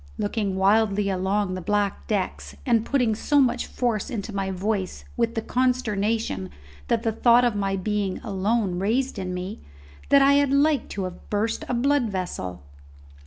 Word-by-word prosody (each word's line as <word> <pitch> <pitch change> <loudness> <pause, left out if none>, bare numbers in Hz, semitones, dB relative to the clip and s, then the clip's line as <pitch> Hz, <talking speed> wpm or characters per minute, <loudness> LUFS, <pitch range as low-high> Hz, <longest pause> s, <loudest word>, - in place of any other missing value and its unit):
looking 205 -2 -1
wildly 200 +1 +3
along 190 +1 0
the 185 - -4
black 205 +1 -1
decks, 200 -4 -2
and 230 -3 +2
putting 250 -5 +2
so 285 +7 +2
much 260 -3 +2
force 240 -1 -1
into 220 -4 -5
my 195 -1 -2
voice 190 0 -2
with 230 -1 0
the 225 - -2
consternation 225 - 0 0.4
that 230 -1 +1
the 225 - +1
thought 240 +2 +4
of 240 -3 +1
my 195 -1 0
being 200 0 -1
alone 200 -2 0
raised 240 +7 0
in 185 -1 -3
me, 180 +3 -5 0.5
that 280 -1 +6
I 280 +1 +6
had 285 -1 +3
like 285 +1 +2
to 200 - -4
have 185 -1 -8
burst 215 +2 -1
a 250 - 0
blood 270 -1 +2
vessel. 135 - -4
210 Hz, 165 wpm, -24 LUFS, 195-240 Hz, 0.5 s, that